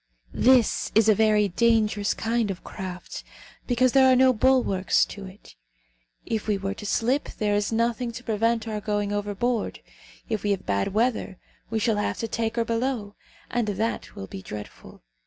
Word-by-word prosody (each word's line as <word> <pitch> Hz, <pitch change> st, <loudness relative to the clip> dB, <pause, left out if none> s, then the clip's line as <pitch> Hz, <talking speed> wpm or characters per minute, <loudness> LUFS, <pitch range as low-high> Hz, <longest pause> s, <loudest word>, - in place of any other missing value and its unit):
"This 250 Hz, -3 st, +3 dB
is 220 Hz, 0 st, +5 dB
a 215 Hz, -, +7 dB
very 210 Hz, 0 st, +3 dB
dangerous 215 Hz, 0 st, +2 dB
kind 225 Hz, -1 st, 0 dB
of 190 Hz, -2 st, -5 dB
craft, 185 Hz, -1 st, -7 dB, 0.4 s
because 250 Hz, 0 st, +3 dB
there 265 Hz, 0 st, +6 dB
are -, -, +5 dB
no 260 Hz, 0 st, +5 dB
bulwarks 240 Hz, -6 st, +2 dB
to 200 Hz, -1 st, -9 dB
it. 190 Hz, -, -15 dB, 0.7 s
If 220 Hz, -1 st, -3 dB
we 210 Hz, -2 st, +1 dB
were 195 Hz, 0 st, -3 dB
to 210 Hz, 0 st, -8 dB
slip, 250 Hz, +8 st, 0 dB
there 210 Hz, -1 st, 0 dB
is 205 Hz, +1 st, 0 dB
nothing 235 Hz, +1 st, 0 dB
to 245 Hz, -, -8 dB
prevent 230 Hz, 0 st, 0 dB
our 215 Hz, -1 st, -3 dB
going 205 Hz, -1 st, -1 dB
overboard. 205 Hz, +3 st, -2 dB, 0.5 s
If 215 Hz, -, -2 dB
we 205 Hz, -, -1 dB
have 200 Hz, -2 st, -1 dB
bad 100 Hz, -, -1 dB
weather, 220 Hz, -4 st, 0 dB, 0.3 s
we 225 Hz, -, -1 dB
shall 220 Hz, -1 st, +1 dB
have 205 Hz, -, -1 dB
to 225 Hz, -, -3 dB
take 225 Hz, 0 st, -2 dB
her 230 Hz, -1 st, 0 dB
below, 230 Hz, -3 st, -2 dB, 0.4 s
and 235 Hz, -2 st, 0 dB
that 220 Hz, +3 st, -3 dB
will 95 Hz, -, -6 dB
be 95 Hz, -, -8 dB
dreadful. 105 Hz, +2 st, -10 dB
220 Hz, 175 wpm, -25 LUFS, 205-235 Hz, 0.7 s, a